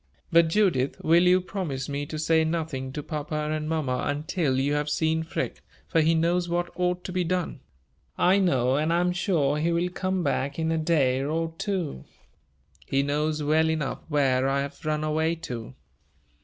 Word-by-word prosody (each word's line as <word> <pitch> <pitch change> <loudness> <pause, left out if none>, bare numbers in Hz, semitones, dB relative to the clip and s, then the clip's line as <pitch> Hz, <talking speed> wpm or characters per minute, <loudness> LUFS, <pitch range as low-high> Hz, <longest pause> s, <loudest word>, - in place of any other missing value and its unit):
But, 170 0 +6
Judith, 165 -8 +1
will 165 +2 +5
you 180 +1 +6
promise 175 -8 -4
me 145 0 -3
to 155 - -5
say 160 +1 +3
nothing 160 -5 -2
to 150 - -4
papa 155 0 -4 0.2
and 155 0 -2
mamma 145 -6 -1
until 145 -1 -1
you 140 +2 +1
have 150 0 0
seen 160 +1 +1
Freke, 165 0 -4 0.3
for 165 - +2
he 160 +1 +3
knows 175 +2 +1
what 175 0 -1
ought 180 0 -1
to - - -5
be 180 0 0
done? 175 -3 -2 0.6
I 190 +3 +4
know 130 -8 +2
and 155 +2 +1
I 170 - +3
am 180 0 +2
sure 165 -6 +1
he 165 +2 +1
will 170 +2 +1
come 185 0 -2
back 140 -1 -1
in 160 0 0
a 165 - +1
day 140 -5 +2
or 165 +3 -2
two. 185 - -3 0.8
He 135 0 +1
knows 150 +2 -1
well 160 +2 +3
enough 155 -4 -2
where 135 -4 +2
I 140 0 +1
have 140 0 -7
run 155 0 -1
away 160 +2 +1
to." 125 -9 -7
160 Hz, 185 wpm, -26 LUFS, 145-170 Hz, 0.8 s, But